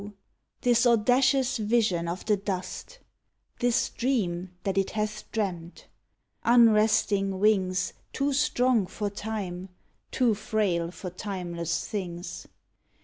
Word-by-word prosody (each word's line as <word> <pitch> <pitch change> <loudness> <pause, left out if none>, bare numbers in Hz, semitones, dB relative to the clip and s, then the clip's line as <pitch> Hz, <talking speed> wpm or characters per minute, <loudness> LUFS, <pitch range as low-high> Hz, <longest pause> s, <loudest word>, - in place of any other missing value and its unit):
this 245 0 +4
audacious 250 +3 +3
vision 210 -6 +1
»of 175 +2 -4
the 215 - +3
dust 200 - -5 0.3
— - - -43
This 245 -1 +2
dream 190 -9 -1
that 195 - -1
it 195 -1 +1
hath 215 0 -4
dreamt! 180 -6 -4 0.6
lUnresting 215 -4 +4
wings, 190 -2 +2 0.2
Too 280 +1 0
strong 250 -6 +2
for 205 +1 -4
Time, 195 -3 -5 0.4
too 245 -4 +2
frail 200 -5 -1
for 180 +1 -7
timeless 175 -4 -4
things 180 -4 -5
210 Hz, 110 wpm, -27 LUFS, 185-230 Hz, 0.6 s, this